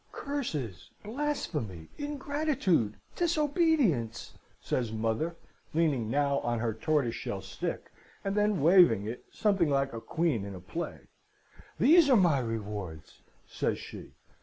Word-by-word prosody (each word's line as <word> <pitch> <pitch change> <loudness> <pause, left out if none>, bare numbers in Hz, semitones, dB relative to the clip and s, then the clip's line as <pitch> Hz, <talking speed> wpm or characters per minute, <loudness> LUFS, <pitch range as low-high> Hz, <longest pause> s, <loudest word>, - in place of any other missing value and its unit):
"'Curses, 150 - -4
blasphemy, 190 - -3
ingratitude, 285 - 0 0.2
disobedience,' 300 - +1 0.3
says 120 -4 -1
mother, 115 +9 -1 0.4
leaning 145 -9 +2
now 140 +2 +2
on 120 0 -1
her 115 0 -1
tortoiseshell 125 +1 -1
stick, - - -5 0.3
and 195 - 0
then 210 -4 +2
waving 165 - +6
it 115 +3 -5
something 195 -7 +2
like 135 -2 +1
a 115 - -5
queen 160 -10 0
in 100 -1 -6
a - - -8
play. 160 - -5 0.8
'These 320 0 +6
are 255 - +7
my 170 -8 +4
rewards!' 105 -9 -5 0.2
says - - -1
she. - - -10
150 Hz, 120 wpm, -30 LUFS, -, 0.8 s, are